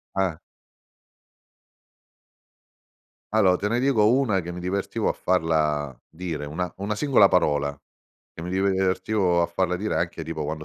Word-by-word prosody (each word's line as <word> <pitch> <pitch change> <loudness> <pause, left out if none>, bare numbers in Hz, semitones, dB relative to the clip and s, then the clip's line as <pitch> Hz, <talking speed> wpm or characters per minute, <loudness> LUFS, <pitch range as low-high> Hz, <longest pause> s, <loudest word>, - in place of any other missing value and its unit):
Eh. 95 -4 0 3.0
Allo 95 -4 +4
te 105 - -2
ne 115 +3 0
dico 130 -6 +3
una 120 -6 +2
che 90 0 -6
mi 90 - -7
divertivo 95 +2 -1
a - - 0
farla 80 -5 0 0.2
dire, 80 -3 -5
una 80 +4 -4
una 100 +2 -3
singola 125 -4 +5
parola 75 -6 +1 0.6
che 80 - -8
mi 90 - -5
divertivo 95 -1 +1
a - - +1
farla 90 +1 -1
dire, 105 +4 -2
anche - - -2
tipo 80 -1 -4
quando 75 +1 -5
90 Hz, 140 wpm, -24 LUFS, 80-100 Hz, 3.0 s, singola